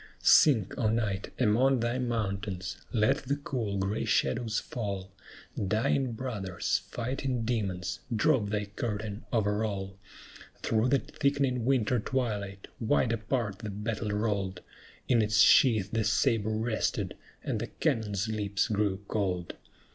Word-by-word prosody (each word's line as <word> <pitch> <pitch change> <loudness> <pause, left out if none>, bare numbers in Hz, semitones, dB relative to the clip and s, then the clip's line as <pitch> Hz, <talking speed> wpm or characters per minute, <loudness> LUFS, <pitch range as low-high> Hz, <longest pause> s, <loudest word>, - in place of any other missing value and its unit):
Sink, 115 -11 +6
O 110 - +2
Night, 105 -4 -1
among 125 +3 +3
thy 120 +2 0
mountains! 100 -6 -2
let 115 +4 +3
the 140 0 -2
cool, 120 -8 -3
gray 100 +2 -1
shadows 110 0 +1
fall; 100 -5 -4 0.6
Dying 115 +5 +1
brothers, 110 -7 -2
fighting 125 0 -2
demons, 95 -6 -2 0.2
drop 110 -2 +2
thy 105 0 -1
curtain 105 0 -4
over 105 -2 +1
all! 100 -2 -4 0.6
Through 110 +3 +2
the 140 - +4
thickening 140 -4 0
winter 125 -2 +2
twilight, 105 -5 -2
wide 115 0 +2
apart 110 -3 -2
the 110 - -5
battle 105 +1 -3
rolled, 100 -3 -1 0.5
In 120 -3 +4
its 110 0 +2
sheath 110 -7 +5
the 115 -1 +1
sabre 110 0 +2
rested, 110 +1 -1 0.3
and - - -1
the - - -3
cannon's 105 -2 -1
lips 105 -2 -1
grew 100 -2 0
cold. 90 -4 -1
110 Hz, 130 wpm, -29 LUFS, 100-120 Hz, 0.6 s, Sink